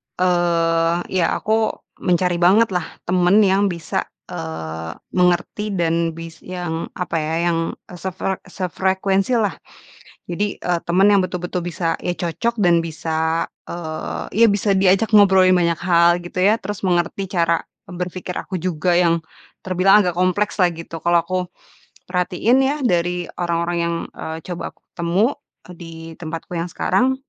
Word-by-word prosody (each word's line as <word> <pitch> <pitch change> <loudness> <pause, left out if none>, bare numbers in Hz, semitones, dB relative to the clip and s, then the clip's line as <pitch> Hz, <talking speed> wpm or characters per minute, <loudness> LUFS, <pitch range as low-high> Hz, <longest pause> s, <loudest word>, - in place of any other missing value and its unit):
eee, 170 -2 +2 0.2
iya, 185 -3 +2
aku 220 0 0 0.2
mencari 180 0 +1
bangetlah, 185 -1 +3 0.2
temen 180 +1 +3
yang 195 +1 +3
bisa, 170 -4 -3 0.2
eee, 80 0 -5 0.2
mengerti 185 +3 +1
dan 165 -1 0
bis 165 0 -9
yang, 175 -3 -4
apa 175 -2 -2
ya, 155 +1 -2 0.2
yang, 165 0 -1 0.2
eee, 180 - -9
sefre 190 +1 -3
sefrekuensi, 190 +4 0
lah. 215 -4 +2 0.8
Jadi, 200 +4 -2
eee, 175 -1 0
teman 185 +4 +4
yang 200 -2 +4
betul-betul 180 -1 -3
bisa, 170 -1 -1
ya 180 - 0
cocok 215 +7 -2
dan 170 -3 +4
bisa, 160 0 -1 0.2
eee, 170 +6 -2
ya - - +8
bisa 200 0 +1
diajak 195 +3 +3
ngobrolin 190 -2 +6
banyak 170 -2 +1
hal 175 0 +4
gitu, 175 +1 -11
ya. 215 +3 +4
Terus, 205 0 -5
mengerti 180 +1 0
cara, 170 -2 +1 0.2
eee, 180 - -8
berpikir 180 0 -5
aku 185 -3 -4
juga 175 0 0
yang 170 -2 +3 0.4
terbilang 195 +3 +4
agak 180 - +1
komplekslah, 185 0 +2
gitu. 165 0 -8
Kalau 170 +1 +2
aku 185 +2 -1 0.7
perhatiin, 180 +7 +2
ya 270 +2 +2
dari 175 -4 +1 0.2
orang-orang 170 0 0
yang, 170 0 0 0.2
eee, 160 0 -6
coba 175 -1 -5
aku - - -37
ketemu, 170 +5 +1 0.5
di 165 -1 -10
tempatku 165 0 -7
yang 165 - -1
sekarang, 255 +8 +1
175 Hz, 145 wpm, -20 LUFS, 170-190 Hz, 0.8 s, ya